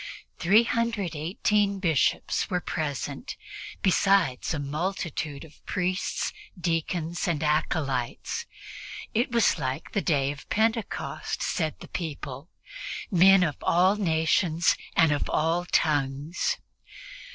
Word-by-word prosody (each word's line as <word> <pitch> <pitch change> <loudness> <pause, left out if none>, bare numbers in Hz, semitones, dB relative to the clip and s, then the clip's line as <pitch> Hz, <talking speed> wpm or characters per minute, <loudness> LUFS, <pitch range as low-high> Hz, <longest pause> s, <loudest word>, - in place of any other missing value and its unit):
Three 205 +7 +5
hundred 230 -7 -1
eighteen 200 +6 +1
Bishops 165 -1 +1
were 180 -2 +1
present, 145 - -4 0.5
besides 195 -8 +3
a 160 - -1
multitude 150 -1 -3
of 155 - -19
priests, 185 +1 -1 0.3
deacons 170 0 -1
and 160 -3 0
acolytes. 150 -5 -1 0.7
It 240 +3 +1
was 235 -2 +3
like 130 +4 -3
the 200 - 0
Day 140 -6 +1
of 145 0 -11
Pentecost, 220 +1 -1
said 160 -4 -1
the - - -9
people: 145 -3 -6 0.6
"men 190 +1 +7
of 150 -5 -1
all 185 +4 +4
nations 165 -2 +2 0.2
and 165 -2 +5
of 145 - 0
all 165 +3 +1
tongues." 145 0 0
165 Hz, 110 wpm, -27 LUFS, 150-190 Hz, 0.7 s, men